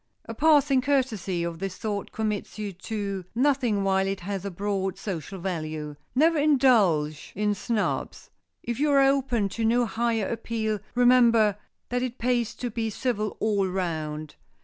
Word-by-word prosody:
A 230 - -6
passing 285 -1 +4
courtesy 225 -11 0
of 170 -1 -4
this 195 -1 -4
sort 205 0 -4
commits 215 -2 -3
you 210 -2 -4
to 200 0 -4
nothing 250 -6 +2
while 190 0 +2
it 195 -1 -3
has 195 +1 -4
a 200 - -3
broad 195 0 -2
social 195 -2 -5
value. 155 -4 -4 0.2
Never 320 +3 +4
indulge 215 - +3
in 210 +1 +1
snubs. 210 +2 -2 0.3
If 235 0 -3
you 300 +1 +2
are 275 - +6
open 270 -6 +2
to 225 +4 -4
no 240 +2 +3
higher 230 -2 0
appeal, 220 -2 -2 0.2
remember 235 -4 +5 0.3
that 245 0 -1
it 255 0 -3
pays 240 -1 0
to 245 -2 -4
be 225 0 -2
civil 215 -2 -2
all 205 -3 +1
round. 155 -5 -3
215 Hz, 155 wpm, -26 LUFS, 190-245 Hz, 0.3 s, are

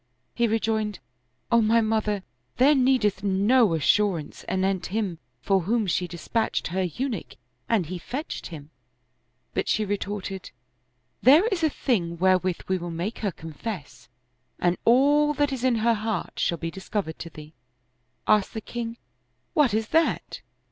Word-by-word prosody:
He 235 0 +2
rejoined, 220 -2 0 0.5
"O 235 0 +5
my 225 +1 +4
mother, 215 -3 0 0.3
there 275 +4 +6
needeth 250 -8 +2
no 205 +1 +3
assurance 170 +1 +1
anent 190 0 0
him 195 -4 -2 0.2
for 195 -1 +3
whom 215 +5 0
she 180 -1 0
dispatched 185 +6 -2
her 190 +3 -1
Eunuch 195 - -3 0.3
and 215 -7 +2
he 180 +3 -5
fetched 270 - -5
him." 155 -3 -10 0.8
But - - -1
she 215 - +1
retorted, 200 -1 -4 0.4
" 125 +1 -46
There 295 - +7
is 370 -6 -1
a 315 - +4
thing 175 - -1
wherewith 185 0 +2
we 185 -1 0
will 175 0 -5
make 175 +7 -4
her 205 -3 -1
confess, 165 +1 -8 0.5
and 175 0 +2
all 290 +5 +4
that 290 -1 +1
is 255 -2 -4
in 255 -2 +3
her 230 +1 +3
heart 215 -3 -3
shall 170 - +1
be 165 0 -4
discovered 190 -3 -4
to 165 - -6
thee." 155 -1 -12 0.7
Asked 210 0 +2
the 220 - -3
king, 230 +1 -5 0.3
" - - -47
What 295 -6 +4
is 220 +1 -1
that? 325 +1 +1
210 Hz, 155 wpm, -25 LUFS, 180-235 Hz, 0.8 s, There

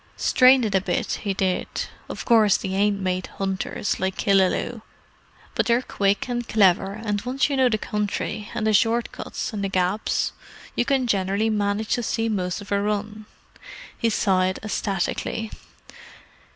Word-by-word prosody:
Strained 255 -1 +5
it 210 - -2
a 190 - +3
bit, 180 -1 -2
'e 195 - +1
did. 185 -2 0 0.4
Of - - -6
course 220 -4 +5
they 190 - -5
ain't 200 +1 +1
made 185 -1 -1
hunters, 195 +1 -2
like 190 0 -1
Killaloe; 195 +4 +2 0.7
but - - 0
they're 240 +1 +3
quick 200 -1 0
and 240 -1 -3
clever, 195 -2 +3
and 210 -1 -3
once 260 +4 0
you - - +1
know 260 -2 +4
the 215 - +1
country, 210 0 -3
and 215 - -1
the 220 - +3
short 230 +2 +2
cuts, - - -5
and 205 -2 -3
the 195 - -1
gaps, 185 +2 0 0.4
you 240 - +1
can 270 -1 +1
generally 200 0 +1
manage 210 0 -1
to 245 - +1
see 225 0 -1
most 185 -2 -2
of 205 - -11
a 200 0 +2
run." 210 +1 -3 0.7
He 230 - 0
sighed 185 -3 +1
ecstatically. 215 +1 -2
210 Hz, 165 wpm, -24 LUFS, 195-225 Hz, 0.7 s, Strained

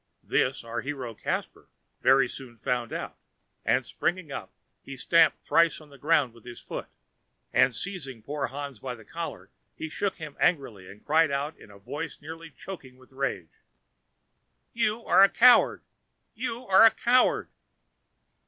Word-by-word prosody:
This 130 0 0
our 115 +1 -4
hero, 135 -4 -5
Caspar, - - -4 0.3
very 135 -1 +5
soon 125 -2 -9
found 120 +1 -2
out; - - -5 0.4
and - - +2
springing 175 -4 -2
up, - - -6 0.3
he 135 -1 -9
stamped 165 +5 +4
thrice 165 -1 +2
on 150 -2 -16
the 140 - -15
ground 145 -4 +2
with 115 -2 -18
his 120 -1 -9
foot, - - -6 0.7
and 125 - +4
seizing 135 - -6
poor 145 -1 -3
Hans 140 -3 -7
by 125 +1 -5
the 110 -3 -15
collar, - - -7 0.2
he 160 - -5
shook 195 +4 -2
him 155 -3 -8
angrily, 120 - 0
and 100 +2 -14
cried 160 +1 +4
out 140 +2 -2
in - - -16
a 100 - -14
voice 145 +11 -6
nearly 165 +2 -9
choked 155 -2 -10
with 130 +1 -21
rage: 130 -11 -4 1.1
"You 230 0 0
are - - +5
a 195 - +8
coward! 245 +1 +5 0.5
you 240 +1 -4
are 195 0 +6
a 225 - +10
coward!" 245 +3 +2
140 Hz, 160 wpm, -27 LUFS, 125-170 Hz, 1.1 s, a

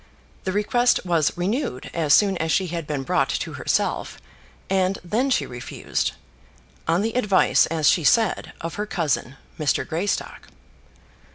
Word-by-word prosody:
The 190 - 0
request 215 +3 +2
was 165 -4 +1
renewed 185 - -2
as 160 -3 0
soon 200 -2 +3
as 160 0 -1
she 190 - +2
had 165 -2 -4
been 145 -3 -2
brought - - +1
to - - -3
herself; - - -1 0.5
and 190 0 +1
then 230 +10 0
she 260 - +1
refused, 120 -1 -3 0.7
on 170 +4 +2
the 225 0 -1
advice, 210 -6 +3
as 160 -2 0
she 170 - +4
said, 220 +5 +2
of 165 0 -4
her 210 - -3
cousin, 150 -8 -1 0.2
Mr. 150 -2 0
Greystock. 175 +6 -3
180 Hz, 150 wpm, -23 LUFS, 160-210 Hz, 0.7 s, she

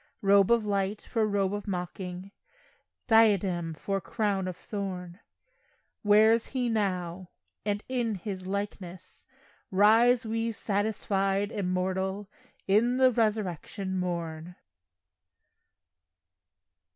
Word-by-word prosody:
Robe 200 -1 +5
of 235 -2 +3
light 200 0 -1
for 225 -3 0
robe 200 -1 0
of 205 +1 -5
mocking, 180 0 -5 0.7
Diadem 195 -7 +3
for 195 +5 -3
crown 200 -2 -1
of 180 -1 -5
thorn, 185 -3 -6 0.8
Wears 220 +2 +5
He 250 -3 -1
now, 185 -4 -2 0.4
and 205 0 -1
in 240 -4 -1
His 185 0 -6
likeness 190 -2 -6 0.4
Rise 225 +5 +4
we, 225 +1 -1
satisfied, 205 -1 -1
immortal, 190 +1 -2 0.4
In 230 +6 +3
the 260 -1 +5
resurrection 200 -4 -1
morn. 170 -1 -4
200 Hz, 95 wpm, -28 LUFS, 185-220 Hz, 0.8 s, Robe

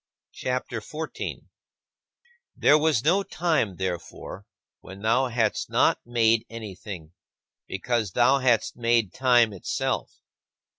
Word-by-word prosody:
CHAPTER 125 -2 -3
XIV 155 +8 -6
17. - - -6 1.1
There 150 - +5
was 155 -7 +2
no 185 +6 +4
time, 160 - 0
therefore, 95 +2 -5 0.3
when 95 +2 -12
thou 120 +4 +3
hadst 115 -3 0
not - - +3
made 115 -1 +3
anything, 95 -7 -8 0.5
because 110 0 -2
thou 130 +3 +4
hadst 125 -4 +2
made 115 -4 +1
time 120 -4 +4
itself. 95 - -3
115 Hz, 110 wpm, -26 LUFS, 100-130 Hz, 1.1 s, There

